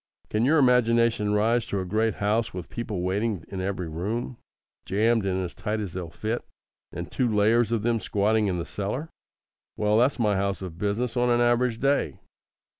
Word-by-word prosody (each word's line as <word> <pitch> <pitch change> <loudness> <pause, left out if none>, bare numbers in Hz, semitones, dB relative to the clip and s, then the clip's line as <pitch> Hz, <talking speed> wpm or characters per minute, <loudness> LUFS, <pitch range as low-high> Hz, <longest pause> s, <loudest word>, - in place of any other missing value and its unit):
Can 110 +2 +2
your 155 +5 +4
imagination 115 -5 +3
rise 110 +3 +2
to 100 - -2
a 95 - -3
great 110 +4 0
house 105 +1 0
with 90 -3 -7
people 105 -6 -4
waiting 100 0 -1
in 95 -1 -4
every 95 -2 -3
room, 105 +10 -3 0.5
jammed 110 +2 +1
in 95 0 0
as 90 - -5
tight 110 +1 -3
as 100 -6 -4
they'll 90 -2 -5
fit, 110 +7 -3 0.5
and - - -6
two 125 -3 0
layers 110 +2 +3
of 115 -3 0
them 115 0 +1
squatting 105 +1 +1
in 90 -2 -1
the 85 - -3
cellar? 115 - -4 0.7
Well, 105 0 +2
that's 125 +4 +3
my 105 -4 +2
house 100 0 -1
of 85 -2 -8
business 105 +5 -1
on 125 0 +2
an 120 0 +3
average 120 -1 +2
day. 140 +1 +1
110 Hz, 190 wpm, -26 LUFS, 100-120 Hz, 0.7 s, your